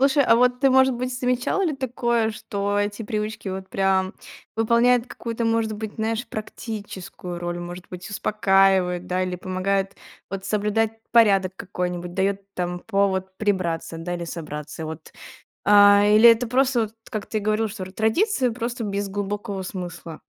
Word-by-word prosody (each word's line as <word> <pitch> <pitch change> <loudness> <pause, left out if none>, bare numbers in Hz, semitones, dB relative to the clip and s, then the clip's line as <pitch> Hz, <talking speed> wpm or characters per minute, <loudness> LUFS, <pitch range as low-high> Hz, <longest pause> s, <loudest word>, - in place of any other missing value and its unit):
Слушай, 275 +1 +4
а 230 - +5
вот 250 +1 +3
ты, 270 -2 +4
может 265 0 +5
быть, 250 +1 -3
замечала 250 +10 0
ли 310 -4 0
такое, 235 -3 0
что 205 -2 -2
эти 205 +2 -2
привычки 215 -1 -3
вот 190 0 -5
прям 190 -1 +1 0.4
выполняют 235 +2 +3
какую-то, 230 -1 -4
может 225 -1 +1
быть, 215 0 -6
знаешь, 225 +2 -2
практическую 200 -5 -7
роль, 175 0 -4
может 175 +1 -7
быть, 180 0 -8
успокаивают, 195 -3 +2
да, 185 +1 0
или 180 -1 -2
помогают 190 +2 -1 0.4
вот 195 -1 -5
соблюдать 210 +2 0 0.2
порядок 195 -5 +5
какой-нибудь, 180 -2 -4
даёт 195 +1 0
там 180 0 -3
повод 190 -2 0
прибраться, 180 -6 -1
да, 175 +2 -4
или 170 -1 -4
собраться? 150 -1 -6
И - - -4
вот 160 0 -8 0.5
А, 205 0 +7
или 215 +3 +8
это 230 +1 +3
просто 255 0 +2
вот, 220 0 -3 0.2
как 215 -2 -4
ты 215 - -2
говорил, 215 +2 0
что 200 -3 -6
традиции, 250 - +1
просто 235 0 -4
без 200 -1 -2
глубокого 205 0 -3
смысла. 175 -3 -6
205 Hz, 160 wpm, -23 LUFS, 185-230 Hz, 0.5 s, или